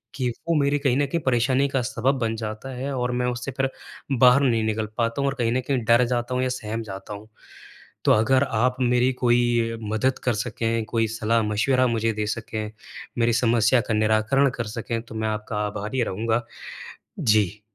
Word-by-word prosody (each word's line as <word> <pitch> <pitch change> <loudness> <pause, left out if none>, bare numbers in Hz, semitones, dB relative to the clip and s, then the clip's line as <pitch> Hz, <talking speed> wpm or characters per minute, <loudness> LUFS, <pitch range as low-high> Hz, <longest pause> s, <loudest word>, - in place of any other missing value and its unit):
कि 125 -3 -1 0.2
वो 165 - +3
मेरे 140 +1 +2
कहीं 135 -3 +1
न 145 - +2
कहीं 165 +3 -2
परेशानी 130 +2 +2
का 135 -1 0
सबब 130 +3 0
बन 115 -2 -1
जाता 110 +3 -5
है 135 +3 -4
और 125 -1 -1
मैं 125 0 -1
उससे 125 +2 -3
फिर 135 0 +1 0.5
बाहर 125 +2 +6
नहीं 115 -5 +2
निकल 110 0 -1
पाता 115 +3 0
हूँ, 140 - +1
और - - -2
कहीं 115 -1 +1
न 130 - +1
कहीं 135 -3 +1
डर 120 +2 +5
जाता 120 +1 -2
हूँ 130 - +1
या 130 - 0
सहम 115 -2 -4
जाता 95 0 -8
हूँ। 105 +1 -10 0.8
तो - - +5
अगर 130 +5 +3
आप 125 0 0
मेरी 125 +1 +3
कोई 120 -2 +1
मदद 130 +4 +1
कर 125 -3 +2
सकें, 115 0 -2
कोई 115 -1 0 0.2
सलाह-मशवरा 115 +4 +2
मुझे 115 -1 0
दे 105 0 -2
सकें, 110 -1 -4 0.5
मेरी 115 0 +3
समस्या 120 +1 +3
का 115 - +1
निराकरण 110 +6 +2
कर 120 - -2
सकें, 115 0 -3
तो 115 - -12
मैं 110 0 -1
आपका 105 0 -2
आभारी 105 +5 -3
रहूँगा। 115 +4 -1 0.8
जी। 105 -2 +2
120 Hz, 195 wpm, -24 LUFS, 110-130 Hz, 0.8 s, बाहर